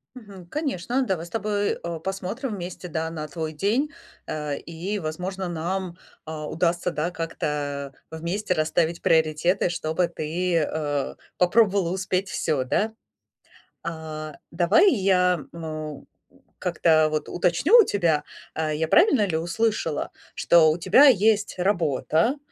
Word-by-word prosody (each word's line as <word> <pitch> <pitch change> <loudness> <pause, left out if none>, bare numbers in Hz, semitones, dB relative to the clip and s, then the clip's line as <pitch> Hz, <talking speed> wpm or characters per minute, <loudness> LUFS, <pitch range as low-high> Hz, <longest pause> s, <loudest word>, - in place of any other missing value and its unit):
Мгм. 200 -7 -12
Конечно, 265 - -1
давай 180 -6 -1
с 170 - -12
тобой, 205 -2 -1
э, 170 -1 -4
посмотрим 195 +7 -3
вместе, 180 -1 -7
да, 160 0 -2
на 155 -2 -5
твой 160 +1 -4
день, 225 - 0 0.4
э, 150 -2 -3
и, 175 +5 -5
возможно, 180 +3 -4
нам, 175 +2 -3 0.3
а, 155 -1 -5
удастся, 175 +1 0
да, 170 +1 -2
как-то 145 -4 -3 0.2
вместе 175 +5 -2
расставить 165 +1 0
приоритеты, 160 +4 +2
чтобы 165 +1 -1
ты, 170 +2 -2
э, 150 -2 -2 0.2
попробовала 195 -1 +3
успеть 190 0 -1
всё, 150 -8 -1
да. 210 - 0 0.9
А, 155 -2 -6 0.2
давай 175 - +4
я, 180 -4 +2
м, 155 -3 -6 0.3
э, - - -24 0.2
как-то, 155 -2 +3
вот, 155 -1 -2
уточню 180 - +3
у 455 - +8
тебя. 170 - +1 0.3
Э, 160 -1 -1
я 160 +2 0
правильно 265 - +4
ли 170 -4 -1
услышала, 170 -1 -1 0.3
что 165 -2 +5
у 155 - -1
тебя 190 +12 +6
есть 215 -5 +3
работа, 170 - +1
170 Hz, 135 wpm, -24 LUFS, 155-195 Hz, 0.9 s, у